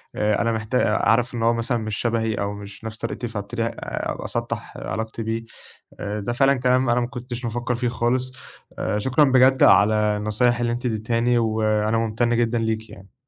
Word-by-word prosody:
آآ 105 -1 +1
أنا 115 - +1
محتا 110 +2 -1
آآ 105 - +1
عارف 120 +2 +2
إن 115 - -2
هو 115 - +4
مثلًا 115 +1 0
مش 110 -2 -3
شبهي 115 -2 0
أو 100 0 -2
مش 100 +1 -10
نَفْس 110 0 -5
طريقتي 115 +1 -4
فابتدي 110 +1 -4
ه - - +1
أ - - -5
أسطّح - - -4
علاقتي 110 0 -4
بيه، 115 +1 -3 0.6
آآ 105 +1 -3
ده 120 +4 -3
فعلًا 135 +2 +4
كلام 125 0 +2
أنا 120 +1 +3
ما 120 - -1
كنتش 125 -1 -7
بافكّر 120 +1 -2
فيه 120 +1 -1
خالص 125 +2 0 0.5
آآ 105 - -1
شكرًا 130 +7 +3
بجد 130 0 +4
على 105 +2 +6 0.2
النصايح 120 +3 +1
اللي 120 0 0
أنتِ 120 +1 -3
ادّيتهاني 115 +2 +1
وأنا 110 -1 +1
مُمتَن 115 +1 0
جدًا 120 0 +1
ليكِ 110 0 -2
يعني. 95 0 -14
115 Hz, 195 wpm, -23 LUFS, 110-120 Hz, 0.6 s, على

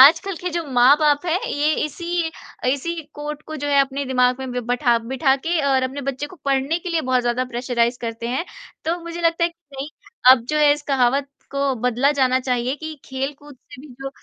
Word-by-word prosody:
आजकल 325 +7 +7
के 360 - -2
जो 340 -1 -2
माँ 250 +4 +6
बाप 295 +1 +3
है 345 +2 +2
ये 300 +1 +2
इसी 340 +2 -2 0.4
इसी 335 +4 -3
कोट 295 0 -6
को 310 - -6
जो 290 - -4
है 280 -1 +5
अपने 275 +1 -1
दिमाग 250 -1 +2
में 260 - -4
ब 250 - -1
बैठा 245 -1 +2
बैठा 265 +4 +1
के 330 +4 -1
और 265 -1 +3
अपने 260 +2 -3
बच्चे 275 +2 -3
को 365 - -14
पढ़ने 275 +4 +1
के 360 - -6
लिए 330 - +1
बहुत 255 -3 +1
ज़्यादा 240 +1 0
प्रेशराइज़ 245 -1 -1
करते 230 0 -4
हैं, 260 +8 -1 0.4
तो 335 +2 0
मुझे 340 0 -6
लगता 335 0 +2
है - - +3
कि 335 - -30 0.2
नहीं, 280 +2 -4 0.4
अब 255 -3 +6
जो 305 - 0
है 295 -1 +6
इस 295 - -3
कहावत 275 0 +1 0.2
को 275 -1 0
बदला 250 +3 +2
जाना 260 -2 +2
चाहिए 250 0 -1
कि 315 +1 -6
खेलकूद 275 +1 -5
से 260 +1 -14
भी 300 - -12
जो 270 - -3
275 Hz, 220 wpm, -22 LUFS, 255-310 Hz, 0.4 s, आजकल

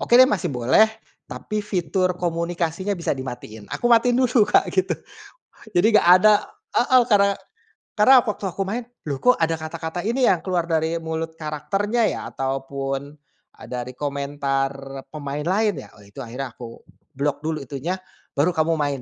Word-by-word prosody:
oke 240 - +1
deh 255 - +9
masih 190 -6 -1
boleh, 125 - +4 0.4
tapi 215 -1 -4
fitur 185 -2 0
komunikasinya 170 +2 -2
bisa 170 - -1
dimatiin. 120 -5 -8
Aku - - -2
matiin 240 +1 +4
dulu 250 -3 +4
Kak - - +4
gitu, 185 -2 +1 0.8
jadi 175 +4 +4
nggak - - 0
ada 215 0 +7 0.4
heeh, 255 +1 +5
karena 200 -2 +5 0.7
karena 235 +6 +7
waktu 210 -2 -4
aku 190 +1 -4
main, 230 +4 -3 0.2
loh 140 - -2
kok 250 - +6
ada 165 0 +1
kata-kata 160 +2 -5
ini 245 +4 +2
yang 180 - +3
keluar 180 -3 0
dari 160 0 +1
mulut 160 0 -4
karakternya 195 +9 -1
ya, - - -2
ataupun, 135 +1 -4 0.4
e - - -19
dari 125 0 -5
komentar 140 -1 -3
pemain 145 -1 -5
lain 205 +3 +1
ya, - - -14
oh 105 - -16
itu 100 +7 -13
akhirnya 125 +3 -6
aku 115 -2 -10 0.4
block 140 +1 -1
dulu 160 0 -1
itunya, 140 +7 -4 0.4
baru 155 +6 +3
kamu 160 +1 +2
main 145 -3 -1
160 Hz, 160 wpm, -23 LUFS, 140-200 Hz, 0.8 s, deh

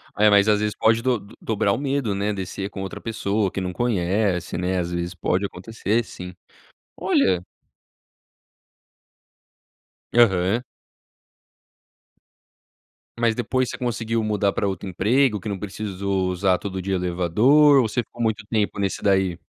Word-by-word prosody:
Olha, 105 +1 +5
mas 100 0 +5
às 105 -1 +4
vezes 105 0 -1
pode 115 +1 +3
do 125 -2 +1 0.2
dobrar 105 -2 0
o - - -1
medo, 135 -5 -1
né, 100 +2 -1
descer 95 0 -4
com 95 - -7
outra 95 - -7
pessoa, 105 -3 -1
que - - -4
não 90 -1 -3
conhece, 95 -5 0
né, 90 +1 -1
às 90 -1 -2
vezes 85 +1 -3
pode 90 +2 0
acontecer 110 +4 -2
sim. 90 -3 -9 0.6
Olha 90 -2 +2 2.7
Aham. 105 -1 +3 2.5
Mas 115 -1 +2
depois 130 +1 0
você - - -6
conseguiu 115 -2 -1
mudar 105 -2 +1
para 100 - -1
outro 95 0 -4
emprego, 110 +5 +2
que 95 - -8
não 100 -2 -3
precisou 100 -2 -2
usar 90 0 +1
todo 95 -2 -5
dia 95 +1 -1
elevador, 105 - +4
ou 115 - 0
você 120 +3 -1
ficou 120 0 -11
muito 110 -2 0
tempo 105 -2 -1
nesse 100 -1 -2
daí? 95 -3 +2
100 Hz, 145 wpm, -23 LUFS, 95-115 Hz, 2.7 s, Olha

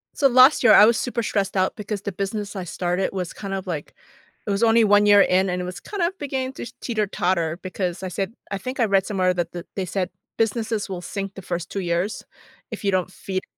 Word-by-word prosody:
So 280 - +4
last 255 +3 +6
year 220 -3 +7
I 210 - +9
was 230 0 +4
super 240 -2 -2
stressed 195 -2 -1
out 185 -1 +1
because 210 -2 -4
the 200 - -4
business 205 +2 -4
I 190 - -3
started 180 +2 -1
was 180 -3 -4
kind 200 -2 -6
of 190 -1 -3
like 155 -5 -4 0.5
it - - -2
was 200 +3 +1
only 230 0 +5
1 205 0 +5
year 205 -1 +7
in 190 0 +3
and 180 0 -1
it - - -4
was 180 0 -6
kinda 375 -3 -2
beginning 265 -2 -3
to - - -7 0.2
teeter-totter 185 -7 -1
because 185 -1 -3
I - - -2
said 195 +4 -3 0.2
I 200 - -1
think 255 +6 -6
I 230 - +4
read 195 -2 +2
somewhere 185 -3 +1
that 175 -1 -2
that 175 0 -7
they 190 -2 -2
said, 180 +1 -2 0.3
"Businesses 225 -1 -1
will 185 -2 -4
sink 195 +1 -5
the 195 - -9
first 175 -1 -4
2 200 - -3
years 175 +4 -2 0.5
if - - -6
you 200 - +2
don't 185 -1 0
feed 190 0 -4
195 Hz, 235 wpm, -23 LUFS, 185-220 Hz, 0.5 s, I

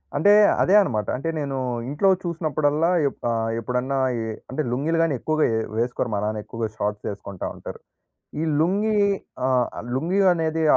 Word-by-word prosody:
అంటే 205 0 +5 0.3
అదే 185 - +3
అన్నమాట. 110 - -1
అంటే 140 +6 -3
నేను 140 -2 -3 0.3
ఇంట్లో 150 +7 +2
చూసినప్పుడల్లా, 155 -2 0 0.2
ఎప్పు 135 - -7
ఆహ్, 115 0 -1
ఎప్పుడన్నా 125 +3 -2 0.5
అంటే 130 +4 -2
లుంగీలు 155 +6 0
గాని 165 - +1
ఎక్కువగా 155 +3 +1 0.3
వేసుకోరు 120 +1 -1
మా 100 - 0
నాన్న. 105 0 -2
ఎక్కువగా 115 -1 -3
షార్ట్స్ 105 0 -2
వేసుకుంటా 100 -1 -6
ఉంటారు. - - -9 0.6
ఈ - - 0 0.2
లుంగీ, 205 +6 +1 0.5
ఆహ్, 125 -2 +2 0.3
లుంగీ 170 +9 0
అనేది 160 -1 -1
140 Hz, 145 wpm, -23 LUFS, 115-165 Hz, 0.6 s, అంటే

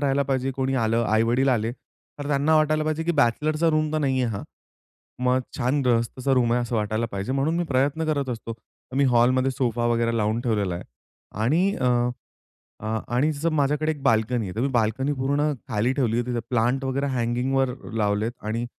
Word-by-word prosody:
राहायला 140 -1 +2
पाहिजे. 135 -1 -1
कोणी 135 0 -1
आलं 115 +1 +1
आई-वडील 115 +5 +2
आले, 115 -2 +1
तर 145 +2 -13
त्यांना 145 +2 +2
वाटायला 155 0 +2
पाहिजे, 155 +1 -1
की 170 - +1
"बॅचलरचा 155 +4 +2
रूम 155 0 0
तर 155 - +1
नाहीये 130 -3 +1
हा" 100 - -5 0.8
मग 125 +1 +3 0.2
छान 130 +3 +1
गृहस्थाचा 125 +2 0
रूम 120 -2 +2
आहे 125 - +2
असं 120 -1 -2
वाटायला 110 +2 -1
पाहिजे 100 +5 -3
म्हणून 140 +5 0
मी 175 - 0
प्रयत्न 145 +2 0
करत 140 -4 -1
असतो 115 -1 -4
तर 115 +3 -17
मी 140 - +4
हॉलमध्ये 130 +2 +3
सोफा 120 -3 -1
वगैरे 115 0 +1
लावून 110 +2 0
ठेवलेला 105 -7 0
आहे 85 - -6 0.6
आणि 175 - +2
अ, 130 - -3 1.0
अ, 110 - -9 0.3
आणि 150 +5 +2 0.2
माझ्याकडे 150 +1 +1
एक 145 -3 -7
बाल्कनी 115 -2 +2
आहे. 90 - -7
तर 115 - -1
मी 135 - +2
बाल्कनी 130 +6 0
पूर्ण 145 +3 0 0.2
खाली 110 +5 +1
ठेवली 120 -5 0
आहे 120 - 0
तिथे 120 -1 -1
प्लांट 125 +3 +1
वगैरे 135 +2 -1
हँगिंगवर 125 +2 0 0.2
लावलेत 105 +1 0 0.2
आणि 115 +2 -2
130 Hz, 185 wpm, -24 LUFS, 115-140 Hz, 1.0 s, मी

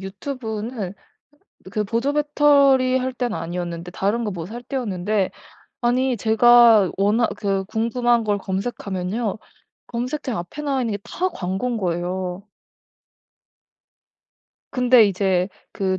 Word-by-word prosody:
유튜브는 220 -1 -5 0.8
그 215 - 0
보조 235 +7 -1
배터리 280 -3 +4
할 260 0 -2
때는 245 -7 -2
아니었는데 170 +1 -5
다른 205 +6 -1
거 210 - -2
뭐 170 -3 -5
살 235 +4 -8
때였는데 210 -6 -1 0.5
아니 250 +1 +1
제가 225 -2 +6
워낙 210 +4 +2
그 195 -1 -1
궁금한 235 +2 +1
걸 205 -1 +1
검색하면요. 195 +1 -3 0.5
검색창 250 0 -3
앞에 175 +13 -6
나와 275 -3 0
있는 230 -3 -1
게 200 - -2
다 370 +1 -1
광곤 195 +6 -2
거예요. 180 0 -3 2.3
근데 250 -2 +5
이제 190 -2 +1 0.2
그 190 -1 -1
220 Hz, 240 characters per minute, -22 LUFS, 190-250 Hz, 2.3 s, 제가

